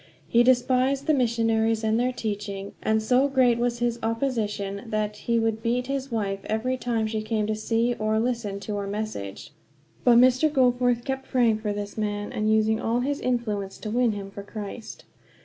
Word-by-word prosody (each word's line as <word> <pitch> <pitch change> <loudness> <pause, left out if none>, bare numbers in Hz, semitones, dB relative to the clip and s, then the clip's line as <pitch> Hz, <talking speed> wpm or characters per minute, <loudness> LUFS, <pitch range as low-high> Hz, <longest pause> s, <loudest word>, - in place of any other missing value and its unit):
He 235 - +4
despised 255 +2 +3
the 310 - +3
missionaries 225 -3 +1
and 220 +1 +2
their 250 +1 +1
teaching, 205 -4 -4
and 220 0 +1
so 255 +4 +3
great 255 -4 +3
was 240 0 0
his 240 0 -1
opposition 220 -4 -2
that 215 -1 -1
he 235 +2 -1
would 225 -1 0
beat 240 +2 0
his 270 0 -3
wife 200 -4 -1
every 230 +4 -1
time 235 -3 -1
she 215 0 -2
came 215 -1 -1
to 215 - -1
see 230 +2 0
us - - -12
or 215 0 +1
listen 230 -4 -2
to 205 0 -4
our 200 -1 -3
message. 200 - -5 0.5
But 240 -2 +6
Mr. 255 +5 +5
Goforth 245 -3 +2
kept 265 -1 -4
praying 235 -4 +3
for 210 -1 -2
this 205 +1 -5
man, 205 -1 -2
and 215 0 0
using 220 0 +2
all 235 +1 0
his 280 +3 -1
influence 215 -6 -2
to 215 - -6
win 240 -1 +2
him 200 -1 -7
for 200 - -7
Christ. 210 +2 -8
225 Hz, 190 wpm, -25 LUFS, 215-245 Hz, 0.5 s, But